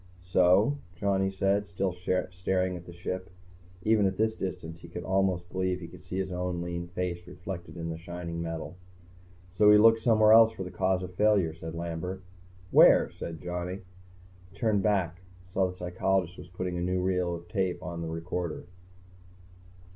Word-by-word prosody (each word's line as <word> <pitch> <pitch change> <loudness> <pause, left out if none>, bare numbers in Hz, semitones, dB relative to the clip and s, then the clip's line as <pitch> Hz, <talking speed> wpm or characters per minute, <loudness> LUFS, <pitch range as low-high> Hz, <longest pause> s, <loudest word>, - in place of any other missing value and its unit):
"So?" 95 +9 +4 0.2
Johnny 95 +1 +1
said, 100 +1 0
still 95 -1 -1
staring 90 +1 -1
at 85 0 -10
the - - -8
Ship. 90 +2 -5 0.5
Even 110 -2 +4
at 95 - -3
this 110 0 +2
distance, 85 -5 -5
he 85 - -12
could 85 +1 -7
almost 95 -2 +1
believe 95 -1 -1
he 85 - -8
could 90 +1 -14
see 90 +1 -5
his 95 -1 -2
own 90 -1 -2
lean 85 0 -4
face 90 0 -4
reflected 90 -2 -7
in 85 0 -4
the 80 - -6
shining 85 -1 -5
metal. 80 0 -5 0.8
"So 105 +2 +5
we 105 - +9
look 115 +1 +6
somewhere 110 -2 +5
else 115 0 +7
for 95 - -5
the 90 - -7
cause 95 -1 0
of 90 0 -7
failure," 100 -4 +3
said 80 0 -7
Lambert. 85 +3 -4 0.5
"Where?" - - +7
said 80 -1 -7
Johnny. 90 +2 -4 0.7
He 100 - -18
turned 105 -2 +2
back, 95 -4 0 0.3
saw 95 +1 +2
that 90 - -3
the - - -18
psychologist 90 0 0
was - - -10
putting 90 0 -4
a - - -3
new 90 +1 0
reel 90 -1 0
on 85 - -9 0.6
the 80 - -4
tape - - -4
recorder. 85 0 -4
90 Hz, 175 wpm, -29 LUFS, 85-95 Hz, 0.8 s, we